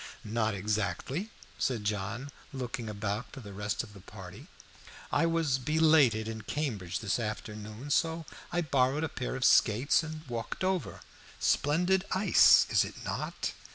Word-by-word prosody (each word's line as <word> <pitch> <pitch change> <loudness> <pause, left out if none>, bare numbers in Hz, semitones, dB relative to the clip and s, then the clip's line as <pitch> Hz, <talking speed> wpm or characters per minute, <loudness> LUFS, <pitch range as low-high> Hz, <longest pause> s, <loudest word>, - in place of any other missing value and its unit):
"Not 110 -1 0
exactly," 105 - -2 0.3
said 120 -5 0
John, 105 +6 -3 0.2
looking 125 -4 -4
about 105 +1 -3
for - - -9
the 100 -5 -10
rest 105 +3 -2
of 105 -3 -12
the 100 - -12
party. - - -11 0.6
"I 165 - +3
was 165 -5 +1
belated 150 -6 +4
in 110 -1 -5
Cambridge 110 - -3
this 110 +1 0
afternoon, 110 +3 -5
so 165 +2 +1 0.3
I 175 - +1
borrowed 140 -1 +1
a 160 - -1
pair 125 0 -4
of 130 - 0
skates 120 +9 +4
and 155 -1 -7
walked 115 +6 -4
over. 185 -4 -1 0.4
Splendid 180 +6 +2
ice, 190 +3 +6
is - - +5
it - - -8
not?" - - -3
125 Hz, 150 wpm, -30 LUFS, 105-155 Hz, 0.6 s, ice